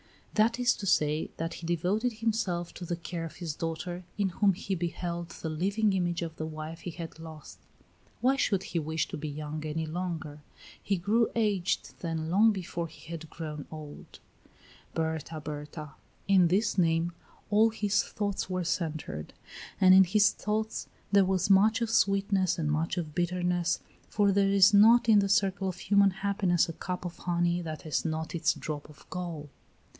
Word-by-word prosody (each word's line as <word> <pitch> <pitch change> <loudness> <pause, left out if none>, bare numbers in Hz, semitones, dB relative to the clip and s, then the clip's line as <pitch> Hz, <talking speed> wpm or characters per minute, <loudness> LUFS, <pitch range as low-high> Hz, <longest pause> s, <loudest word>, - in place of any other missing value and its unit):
That 230 +3 +2
is 245 0 +4
to 200 - -5
say, 150 -3 +2
that 165 +1 -3
he 170 - -7
devoted 190 +8 0
himself 215 -6 -1
to 180 - -7
the 175 - -2
care 170 0 -5
of 165 - -7
his 170 -4 -4
daughter, 170 +3 -4
in 200 -2 +1
whom 195 +2 +2
he 195 +1 -4
beheld 170 -1 -3
the 160 - -6
living 200 +6 +1
image 175 -2 0
of 165 -1 -6
the 155 - -3
wife 155 +1 -7
he - - -6
had 165 -1 -8
lost. 160 -2 -10 0.6
Why 260 +2 +4
should 195 -7 +1
he 170 - -2
wish 160 0 -1
to - - -5
be 155 +1 -5
young 150 +1 -5
any 155 +1 -2
longer? 160 -3 -4 0.4
He 200 - 0
grew 215 +6 +2
aged 205 -5 0
then 165 -1 -3
long 215 +5 +5
before 175 -4 -4
he 160 +1 -13
had 160 -1 -7
grown 150 -3 -6
old. 155 -2 -10 0.8
Berta 160 0 -2
Berta. 150 0 -7 0.4
In 190 -3 +5
this 205 +5 +1
name 165 0 +2 0.4
all 215 +2 +5
his 210 -2 +1
thoughts 200 -2 -3
were 185 -1 -1
centred, 155 - -3 0.5
and 185 -1 +7
in 190 0 +8
his 205 +3 +4
thoughts 215 +1 -3 0.2
there 200 -1 +5
was 185 0 +1
much 215 +4 +5
of 230 -1 0
sweetness 195 -3 +2
and 155 -3 0
much 160 +4 -1
of 160 -4 -3
bitterness, 175 0 0 0.3
for 205 -1 +2
there 195 0 +3
is 200 +1 +6
not 225 +4 +7
in 215 -2 +7
the 200 0 +1
circle 195 -1 +2
of 180 - -5
human 200 +1 +4
happiness 190 -2 +1
a 165 - -5
cup 180 +2 -5
of 175 - -6
honey 175 0 0
that 155 -2 -6
has 155 - -1
not 160 -1 -3
its 170 -1 +1
drop 150 -1 -6
of 150 - -17
gall. 170 -5 -5
175 Hz, 180 wpm, -29 LUFS, 160-200 Hz, 0.8 s, in